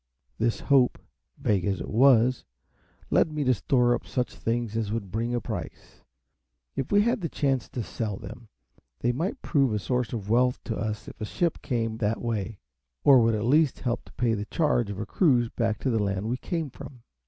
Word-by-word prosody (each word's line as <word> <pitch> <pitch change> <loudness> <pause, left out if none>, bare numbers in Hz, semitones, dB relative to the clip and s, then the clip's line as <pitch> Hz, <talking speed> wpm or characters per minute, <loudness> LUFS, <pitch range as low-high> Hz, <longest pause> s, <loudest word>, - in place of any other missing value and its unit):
This 115 +1 0
hope, 135 -3 +3 0.4
vague 100 -4 +1
as 95 0 -1
it - - -5
was, 125 +1 +4 0.7
led 160 - +3
me 150 -1 -1
to 130 -1 +4
store 120 +3 +2
up 120 - -3
such 125 -2 -2
things 115 -1 -2
as 110 -2 -1
would 105 -4 -3
bring 115 +3 -1
a - - +1
price, - - -7 0.7
if 135 - -3
we 205 0 +5
had 235 0 +1
the 165 - -2
chance 135 -4 0
to 120 - -4
sell 105 -2 -4
them; 115 0 -10 0.5
they 120 - +2
might 175 - -3
prove 140 -6 +2
a 105 - 0
source 125 +3 -1
of 110 -5 -4
wealth 125 +3 +2
to 110 - -3
us 105 0 -4
if - - -11
a - - -1
ship 170 - -1
came 115 -3 -2
that 110 0 0
way, 110 -3 -3 0.5
or 135 -3 +8
would 115 -1 +3
at 105 +1 -2
least 150 +3 +3
help 120 -2 -1
to - - -17
pay 120 -2 +1
the 105 -1 -2
charge 125 -6 +1
of 100 - -5
a 110 - -3
cruise 125 - +2
back 115 -2 -1
to 130 - 0
the 110 -2 +1
land 100 +1 -1
we 120 +2 -1
came 160 -1 -3
from. 125 -1 -11
120 Hz, 210 wpm, -27 LUFS, 110-130 Hz, 0.7 s, or